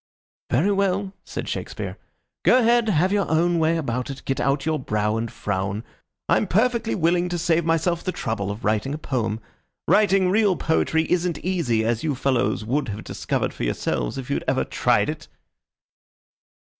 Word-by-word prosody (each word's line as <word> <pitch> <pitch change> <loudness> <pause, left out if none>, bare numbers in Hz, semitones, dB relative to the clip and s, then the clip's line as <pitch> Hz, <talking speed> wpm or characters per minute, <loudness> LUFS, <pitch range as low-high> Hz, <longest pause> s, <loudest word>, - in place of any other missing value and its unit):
"Very 160 +12 +2
well," 195 0 0
said - - -6
Shakespeare. - - -4 0.5
"Go - - +6
ahead. 235 -2 +3
Have 185 0 +2
your 200 -2 +1
own 170 +2 +2
way 165 +1 +2
about 125 -5 -2
it. 135 -1 -7
Get 135 - -1
out 135 +1 +1
your 160 -1 0
brow 105 -3 0
and 115 0 -2
frown. 100 +1 -3 0.4
I'm - - +2
perfectly 235 +3 +1
willing 175 0 +2
to 175 - -2
save 170 -1 +1
myself 165 +1 +1
the 185 - -1
trouble 110 - -3
of 105 +3 -5
writing 110 +7 0
a - - -4
poem. 115 -7 -2 0.5
Writing 195 -3 +4
real 205 -2 +3
poetry 160 0 +1
isn't 175 -2 +1
easy, 140 -12 +1
as 115 0 0
you 150 -3 0
fellows 120 -6 0
would 135 +4 0
have 105 +1 -5
discovered - - -2
for - - -6
yourselves - - -1
if 135 +1 -5
you'd - - -1
ever - - +2
tried - - +2
it." - - -5
160 Hz, 170 wpm, -23 LUFS, 115-180 Hz, 0.5 s, Go